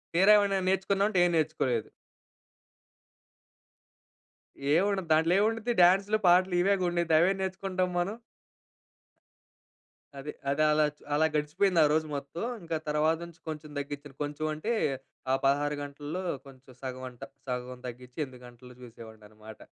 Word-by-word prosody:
తీరా 190 Hz, +4 st, +6 dB
ఏమైనా 200 Hz, -1 st, +1 dB
నేర్చుకున్నాం 195 Hz, +1 st, +1 dB
అంటే, 190 Hz, -, +2 dB
ఏం 175 Hz, -, +2 dB
నేర్చుకోలేదు. 130 Hz, -7 st, 0 dB, 2.9 s
ఏవుండదు 190 Hz, 0 st, +1 dB
దాంట్లో 160 Hz, +2 st, +4 dB
ఏవుండిద్ది? 225 Hz, +3 st, +1 dB
డాన్స్‌లు 195 Hz, +4 st, +5 dB
పాటలు 180 Hz, +1 st, +5 dB
ఇవేగా 195 Hz, 0 st, +2 dB
ఉండిద్ది. 170 Hz, -2 st, +1 dB
అవేం 190 Hz, +4 st, +3 dB
నేర్చుకుంటాం 190 Hz, -1 st, -2 dB
మనం? 190 Hz, +5 st, -1 dB, 2.0 s
అది. 150 Hz, +2 st, -6 dB, 0.2 s
అది 140 Hz, +2 st, +1 dB
అలాగ్ 150 Hz, -1 st, +2 dB, 0.2 s
అలా 155 Hz, +2 st, +3 dB
గడిసిపోయిందారోజు 155 Hz, 0 st, +2 dB
మొత్తం. 140 Hz, +6 st, -5 dB, 0.2 s
ఇంక 165 Hz, -1 st, -6 dB, 0.2 s
తర్వాత 155 Hz, +2 st, +2 dB
నుంచి 170 Hz, -1 st, -15 dB
కొంచెం 155 Hz, -1 st, -6 dB
తగ్గిచ్చెను. 145 Hz, -1 st, -6 dB
కొంచెం 145 Hz, +1 st, -4 dB
అంటే, 185 Hz, +10 st, -2 dB, 0.6 s
ఆ -, -, +4 dB
16 145 Hz, +2 st, +2 dB
గంటల్లో, 145 Hz, +5 st, -6 dB, 0.2 s
కొంచెం 130 Hz, -1 st, -16 dB
సగం 130 Hz, -1 st, -6 dB
అంట. 125 Hz, 0 st, -19 dB, 0.3 s
సగం 125 Hz, 0 st, -4 dB
తగ్గిచ్చి, 125 Hz, +1 st, -10 dB
8 130 Hz, -2 st, -14 dB
గంటలూ 125 Hz, +1 st, -14 dB
చూసేవాడిననమాట. 110 Hz, -2 st, -13 dB
155 Hz, 120 wpm, -29 LUFS, 135-185 Hz, 2.9 s, తీరా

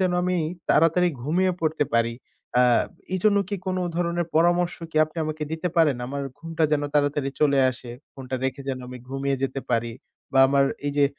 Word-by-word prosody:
যেন 185 Hz, -1 st, +2 dB
আমি 180 Hz, 0 st, +1 dB, 0.3 s
তাড়াতাড়ি 165 Hz, +3 st, +4 dB
ঘুমিয়ে 180 Hz, +6 st, +1 dB
পড়তে 160 Hz, -2 st, +1 dB
পারি, 115 Hz, 0 st, +2 dB, 0.4 s
আ 125 Hz, -, +6 dB, 0.5 s
এই 185 Hz, -, +1 dB
জন্য 205 Hz, -1 st, +5 dB
কি 205 Hz, -, -2 dB
কোনো 185 Hz, 0 st, -1 dB, 0.2 s
ধরনের 170 Hz, -1 st, 0 dB
পরামর্শ 175 Hz, +1 st, +3 dB, 0.2 s
কি 155 Hz, -, -8 dB
আপনি 155 Hz, +2 st, -18 dB
আমাকে 155 Hz, 0 st, -4 dB
দিতে 160 Hz, +3 st, -2 dB
পারেন? 155 Hz, -6 st, +4 dB
আমার 140 Hz, +2 st, -4 dB, 0.2 s
ঘুমটা 165 Hz, 0 st, -1 dB
যেন 145 Hz, -, +2 dB
তাড়াতাড়ি 145 Hz, -1 st, +1 dB
চলে 140 Hz, -2 st, +4 dB
আসে। 120 Hz, -1 st, -8 dB, 0.2 s
ফোনটা 130 Hz, -1 st, -5 dB
রেখে 135 Hz, +1 st, -2 dB
যেন 130 Hz, -1 st, -2 dB
আমি 125 Hz, 0 st, -8 dB
ঘুমিয়ে 135 Hz, +1 st, -1 dB
যেতে 135 Hz, 0 st, -1 dB
পারি 115 Hz, -1 st, 0 dB, 0.4 s
বা 135 Hz, -, +3 dB
আমার 140 Hz, 0 st, +4 dB, 0.2 s
এই 145 Hz, -, 0 dB
যে 145 Hz, -, +5 dB
150 Hz, 190 wpm, -24 LUFS, 135-170 Hz, 0.5 s, আ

